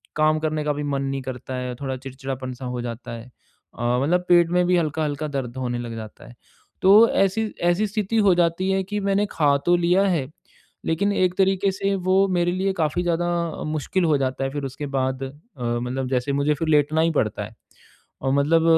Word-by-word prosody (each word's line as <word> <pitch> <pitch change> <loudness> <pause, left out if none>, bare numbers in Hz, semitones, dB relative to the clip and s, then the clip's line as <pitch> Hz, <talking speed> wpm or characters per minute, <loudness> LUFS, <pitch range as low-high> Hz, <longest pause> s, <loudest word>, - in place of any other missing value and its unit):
काम 155 0 +3
करने 155 -1 -1
का 150 0 0
भी 145 +1 -4
मन 140 -1 -1
नहीं 135 0 -2
करता 130 0 -6
है, 125 -1 -4
थोड़ा 135 -1 -3
चिड़चिड़ापन-सा 130 -1 -6
हो 125 -1 -3
जाता 120 0 -6
है। 115 0 -7 0.5
अ, 120 +1 +1
मतलब 175 +5 +1
पेट 175 -1 +5
में 180 0 +3
भी 180 0 +3
हल्का-हल्का 155 -2 -1
दर्द 135 -4 -4
होने 120 -2 -2
लग 120 -1 -5
जाता 110 -1 -9
है, 120 - -14 0.5
तो 205 +4 +7
ऐसी 195 +3 +1 0.2
ऐसी 175 +5 +2
स्थिति 215 +1 -1
हो 190 - +6
जाती 175 +2 +1
है 190 0 +1
कि 205 +2 -3
मैंने 200 +1 +1
खा 145 -3 +3
तो 175 - +5
लिया 175 +3 +3
है, 165 -8 0 0.6
लेकिन 200 +6 +1
एक 185 -2 +2
तरीक़े 195 0 +2
से 195 +1 -1
वो 190 +1 +2
मेरे 175 0 +2
लिए 190 +2 0
काफ़ी 160 +3 0
ज़्यादा 175 0 0 0.4
मुश्किल 175 +5 -1
हो 155 -3 +3
जाता 135 0 -2
है 135 - 0
फिर 145 0 -4
उसके 135 +2 -5
बाद 130 0 -1
अ, 135 - -4 0.3
मतलब 125 +2 -2
जैसे 130 +1 0
मुझे 150 +1 +2
फिर 160 +3 -3
लेटना 150 +1 +3
ही 165 +1 +2
पड़ता 105 -1 -1
है। 110 - -12 0.7
और 135 0 0
मतलब 155 +4 +3
150 Hz, 205 wpm, -23 LUFS, 130-180 Hz, 0.7 s, तो